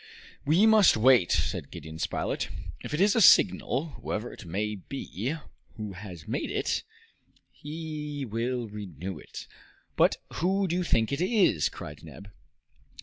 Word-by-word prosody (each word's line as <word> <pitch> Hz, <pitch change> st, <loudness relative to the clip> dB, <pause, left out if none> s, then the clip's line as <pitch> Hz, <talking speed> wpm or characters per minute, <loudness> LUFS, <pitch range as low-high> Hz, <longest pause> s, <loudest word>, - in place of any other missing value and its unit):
"We 165 Hz, +9 st, +5 dB
must 215 Hz, -, +6 dB
wait," 120 Hz, -5 st, +5 dB
said 80 Hz, -3 st, 0 dB
Gideon 80 Hz, 0 st, -9 dB
Spilett. -, -, -2 dB, 0.3 s
"If -, -, -6 dB
it -, -, -3 dB
is 200 Hz, +2 st, +4 dB
a 225 Hz, -, +4 dB
signal, 150 Hz, -5 st, +4 dB
whoever 110 Hz, +3 st, -4 dB
it 95 Hz, -, -11 dB
may 105 Hz, +5 st, -2 dB
be 120 Hz, -, -5 dB, 0.4 s
who 105 Hz, -2 st, -5 dB
has 90 Hz, -4 st, -10 dB
made -, -, -2 dB
it, -, -, -1 dB, 0.7 s
he 150 Hz, -2 st, -6 dB
will 120 Hz, +2 st, -2 dB
renew 95 Hz, -4 st, -7 dB
it." -, -, -9 dB, 0.5 s
"But -, -, +4 dB, 0.2 s
who 190 Hz, +3 st, +1 dB
do 175 Hz, -, -1 dB
you 180 Hz, -, 0 dB
think 115 Hz, -8 st, +1 dB
it 140 Hz, +3 st, -1 dB
is?" 185 Hz, -, +3 dB
cried -, -, -9 dB
Neb. 100 Hz, 0 st, -11 dB
125 Hz, 145 wpm, -28 LUFS, 100-165 Hz, 0.7 s, must